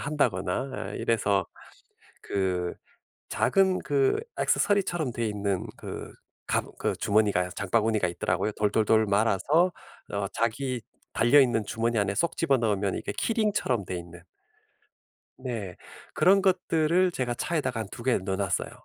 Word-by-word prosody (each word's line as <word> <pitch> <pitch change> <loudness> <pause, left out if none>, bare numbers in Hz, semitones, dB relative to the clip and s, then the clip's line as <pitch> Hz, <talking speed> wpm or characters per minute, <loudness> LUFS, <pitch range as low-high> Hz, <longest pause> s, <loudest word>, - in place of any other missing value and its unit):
한다거나 130 -5 -1
아 - - -5
이래서 100 -5 +1 0.8
그 90 -3 -1 0.6
작은 190 -1 +2
그 140 -2 +1 0.2
액세서리처럼 175 -9 +1
되어 115 0 -2
있는 100 -3 -2
그 - - -7 0.3
갑 - - +1
그 - - 0
주머니가 100 -4 +2
장바구니가 105 0 +1
있더라고요. 85 +4 -1
돌돌돌 110 +1 +2
말아서 115 - +2 0.4
어 100 -1 -1
자기 125 +2 -1 0.3
달려 120 +5 +5
있는 120 -4 +2
주머니 115 +2 -1
안에 100 -1 0
쏙 170 +7 0
집어넣으면 110 - +1
이게 - - -5
키링처럼 210 - 0
되어 90 - -4
있는. 85 0 -10 1.2
네. 115 -8 -5 0.4
그런 195 +2 +5
것들을 180 -1 +2
제가 125 -6 -2
차에다가 130 -4 -2
한 110 - -6
2 - - -8
개 130 -1 +3
넣어 95 0 -3
놨어요. 95 -4 -1
115 Hz, 295 characters per minute, -27 LUFS, 100-145 Hz, 1.2 s, 달려